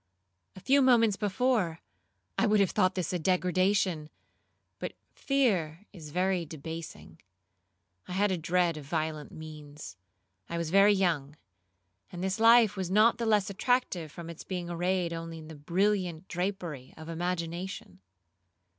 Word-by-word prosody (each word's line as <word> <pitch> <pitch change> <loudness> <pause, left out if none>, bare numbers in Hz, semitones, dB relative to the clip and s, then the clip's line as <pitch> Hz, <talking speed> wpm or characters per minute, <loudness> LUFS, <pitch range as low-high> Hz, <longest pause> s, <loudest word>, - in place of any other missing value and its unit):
A - - -9
few 275 +8 +3
moments 230 -5 +5
before 205 -4 0 0.6
I 230 - +2
would 210 0 +4
have 195 -3 +3
thought 185 -3 +2
this 185 0 -2
a 180 - 0
degradation, 185 -2 +1 0.7
but - - -4 0.2
fear 205 - 0
is 160 -6 -10
very 180 +2 0
debasing. 155 - -8 0.9
I 180 - -6
had 200 +2 +2
a 185 - 0
dread 170 0 +1
of 150 - -8
violent 155 -1 -3
means,—I 145 - -11
was 165 -1 -3
very 200 +2 +6
young, 165 -7 0 0.8
and 190 +4 -3
life 225 -2 +6
was 190 -3 -3
not 215 +5 +4
the 230 - -1
less 205 -3 +2
attractive 195 - 0
from 170 +1 -9
its 170 -1 -8
being 175 -2 -4
arrayed 175 0 0
only 165 0 -6
in 155 0 -11
the 160 - -9
brilliant 180 +2 0
drapery 175 -7 -4
of 160 0 -10
imagination. 170 - -4
180 Hz, 140 wpm, -29 LUFS, 160-195 Hz, 0.9 s, very